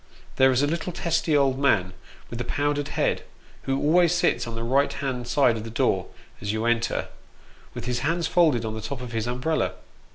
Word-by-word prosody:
There 130 0 +6
is 130 +2 +2
a - - +5
little 170 +4 -2
testy 165 -2 +1
old 135 -1 +2
man, 95 -10 +2 0.4
with 120 0 -4
a - - -1
powdered 145 +3 -1
head, - - +1 0.4
who 135 0 0
always 170 +3 +4
sits 175 - +1
on 115 - -6
the 115 - -4
right 135 +4 +2
hand 125 -3 -4
side 120 -2 +3
of 110 - -5
the 115 - -7
door 115 - 0 0.3
as 100 - -2
you 110 +1 -2
enter, 120 0 0 0.7
with - - -6
his 125 -1 -1
hands 165 +6 0
folded 160 -8 +3
on 110 - -3
the 110 - -5
top 125 +4 -5
of 125 -1 -7
his 115 0 -2
umbrella. 125 - -1
130 Hz, 205 wpm, -25 LUFS, 115-145 Hz, 0.7 s, There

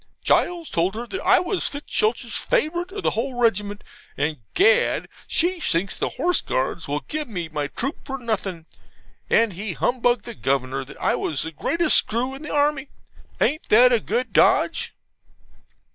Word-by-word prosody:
Gules 345 -2 +1
told 175 +4 +1
her 235 +2 -4
that 380 - -5
I - - +5
was 360 +1 -1
Fitzstultz's 235 -5 -1
favourite 350 -6 0
of 405 -1 -6
the - - +2
whole 250 +4 -2
regiment; 205 -3 0 0.3
and, 150 +1 -1 0.2
Gad! 475 +6 +4 0.2
she 350 +2 +1
thinks 190 - 0
the - - -1
Horse 355 0 +1
Guards 135 +6 -2
will 145 +1 -1
give 305 -1 -4
me 175 -7 -4
my 150 -2 -2
troop 270 - -4
for 270 -1 -4
nothing, 200 -9 -3 0.6
and 225 -3 +3
he 200 +1 -4
humbugged 245 +1 +1
the 235 - -6
Governor 135 - -1
that 135 - -13
I - - +2
was 150 -2 -2
the 160 - -5
greatest 325 - +1
screw 245 +4 0
in 270 - -9
the 305 - -7
army. 290 -1 +1 0.5
Ain't 310 +2 0
it 245 +3 +7
a 235 - +4
good 235 +5 -2
dodge?' - - +3
235 Hz, 170 wpm, -23 LUFS, 180-300 Hz, 0.6 s, it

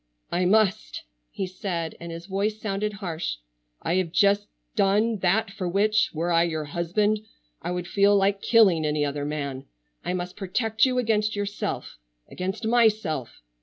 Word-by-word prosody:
"I 180 +1 +1
must!" 215 +1 +2 0.3
he 190 - -3
said, 180 -3 -4
and 170 0 -7
his 165 +1 -7
voice 200 +3 -1
sounded 210 0 -2
harsh. 175 - -3 0.5
"I 170 - +1
have 180 -3 0
just 200 +2 +3 0.3
done 210 +2 +2
that 195 +3 +1
for 190 -3 -3
which, 210 +4 +2
were 165 +2 -2
I 165 0 +4
your 160 -3 -1
husband, 175 +7 0 0.4
I - - -4
would 180 0 -2
feel 200 +1 +4
like 195 0 +2
killing 195 -9 +5
any 150 -1 +1
other 145 0 -3
man. 140 -3 -4 0.4
I - - -2
must 180 0 -4
protect 220 +4 +1
you 255 -1 0
against 215 -3 +1
yourself,—against 185 - -5
myself. 215 - +1
195 Hz, 155 wpm, -25 LUFS, 170-210 Hz, 0.5 s, killing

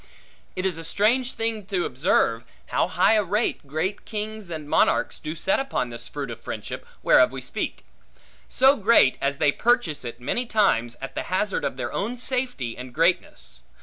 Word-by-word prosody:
It 185 0 -2
is 180 -4 -1
a - - -6
strange 240 +9 +1
thing 225 -3 -3
to 185 -4 0
observe, 125 -4 +1 0.3
how - - +1
high 180 +4 +3
a 215 -1 +3
rate 200 -5 -1
great 160 +8 -2
kings 215 -2 -5
and 155 -3 -6
monarchs - - +2
do 155 +1 -5
set 290 - +1
upon 270 - -2
this 115 0 -6
fruit 140 -3 -5
of 115 - -9
friendship, - - -6 0.2
whereof 125 - +6
we 135 - -5
speak: 130 - -5 0.6
so 265 +2 +5
great, 210 - +4
as 140 0 0
they 145 - +3
purchase 235 - +1
it, 120 -1 -7
many 235 - -2
times, 120 - +2
at 135 - -6
the - - -2
hazard 190 +2 0
of - - -2
their - - -4
own 235 +5 -2
safety 245 - -2
and 125 0 -9
greatness. 65 - 0
180 Hz, 180 wpm, -24 LUFS, 135-220 Hz, 0.6 s, whereof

